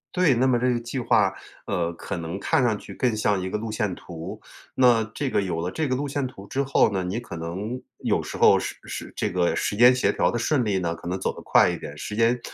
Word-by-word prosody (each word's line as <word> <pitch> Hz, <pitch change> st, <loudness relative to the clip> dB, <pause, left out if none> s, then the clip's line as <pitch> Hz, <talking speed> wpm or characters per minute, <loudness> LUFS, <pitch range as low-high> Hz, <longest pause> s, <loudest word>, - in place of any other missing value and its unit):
对， 180 Hz, -6 st, +4 dB
那 125 Hz, +2 st, +2 dB
么 125 Hz, -2 st, +3 dB
这 125 Hz, +1 st, +1 dB
个 120 Hz, -, -1 dB
计 120 Hz, +3 st, -6 dB
划， 120 Hz, -, +3 dB, 0.4 s
呃， 85 Hz, -3 st, -1 dB
可 95 Hz, +3 st, -5 dB
能 85 Hz, +3 st, -5 dB
看 130 Hz, -, +2 dB
上 115 Hz, -4 st, +2 dB
去 -, -, -11 dB
更 125 Hz, -3 st, +1 dB
像 105 Hz, -2 st, +1 dB
一 95 Hz, -, -3 dB
个 100 Hz, -, -2 dB
路 110 Hz, 0 st, -4 dB
线 105 Hz, -3 st, -1 dB
图。 85 Hz, -2 st, -8 dB, 0.3 s
那 120 Hz, -3 st, +4 dB
这 140 Hz, +1 st, -2 dB
个 -, -, +1 dB
有 85 Hz, -3 st, -2 dB
了 85 Hz, -, -2 dB
这 155 Hz, +9 st, -2 dB
个 130 Hz, -, 0 dB
路 145 Hz, +3 st, -2 dB
线 140 Hz, 0 st, -2 dB
图 100 Hz, -6 st, -9 dB
之 140 Hz, +5 st, -1 dB
后 135 Hz, -5 st, +3 dB
呢， 95 Hz, -2 st, -1 dB
你 95 Hz, +6 st, -2 dB
可 120 Hz, -, -8 dB
能 95 Hz, +9 st, -4 dB, 0.2 s
有 -, -, +1 dB
时 -, -, -7 dB
候 -, -, +6 dB
是 -, -, -4 dB
是 -, -, -7 dB
这 -, -, -1 dB
个 90 Hz, -1 st, +1 dB
时 -, -, -1 dB
间 125 Hz, +3 st, +8 dB
协 130 Hz, -, +2 dB
调 -, -, +1 dB
得 120 Hz, -, -2 dB
顺 130 Hz, +1 st, +1 dB
利 100 Hz, -3 st, +1 dB
呢， 85 Hz, -2 st, -2 dB
可 85 Hz, -, -10 dB
能 90 Hz, +2 st, -2 dB
走 -, -, -1 dB
得 -, -, -9 dB
快 -, -, +5 dB
一 -, -, -2 dB
点， 75 Hz, -, -8 dB
时 105 Hz, +7 st, -6 dB
间 115 Hz, +2 st, +3 dB
110 Hz, 285 characters per minute, -25 LUFS, 90-125 Hz, 0.4 s, 间